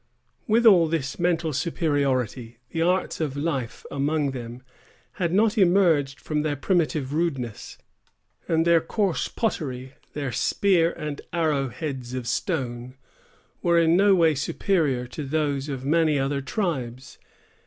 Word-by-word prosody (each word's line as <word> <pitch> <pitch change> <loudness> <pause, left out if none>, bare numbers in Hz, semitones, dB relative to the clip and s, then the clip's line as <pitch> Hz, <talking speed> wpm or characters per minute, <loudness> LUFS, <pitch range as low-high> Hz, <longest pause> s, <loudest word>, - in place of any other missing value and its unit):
With 230 +2 +3
all 180 -7 +7
this 155 -3 -3
mental 170 -2 0
superiority, 135 - -1
the 165 - -2
arts 180 0 0
of 145 -3 -2
life 140 -6 -3
among 145 0 0
them 120 -1 -8 0.6
had 170 -2 +1
not 215 +4 +2
emerged 170 -7 +3
from 150 -1 -2
their 150 -1 -1
primitive 150 -3 0
rudeness; 135 -9 -3 0.7
and 165 0 +2
their 170 -1 +5
coarse 195 +2 -1
pottery, 130 - -3 0.2
their 140 -3 -3
spear 175 - +2
and 150 -1 -6
arrow 155 -5 0
heads 130 -4 -5
of 125 -2 -4
stone, 125 - -3 0.7
were 170 -1 +3
in 165 0 +4
no 200 +1 +5
way 165 -3 +4
superior 145 -3 0
to 130 +5 -7
those 145 -1 -1
of 135 -2 -5
many 155 0 +3
other 140 +1 -1
tribes. 130 - -4
150 Hz, 135 wpm, -25 LUFS, 135-170 Hz, 0.7 s, all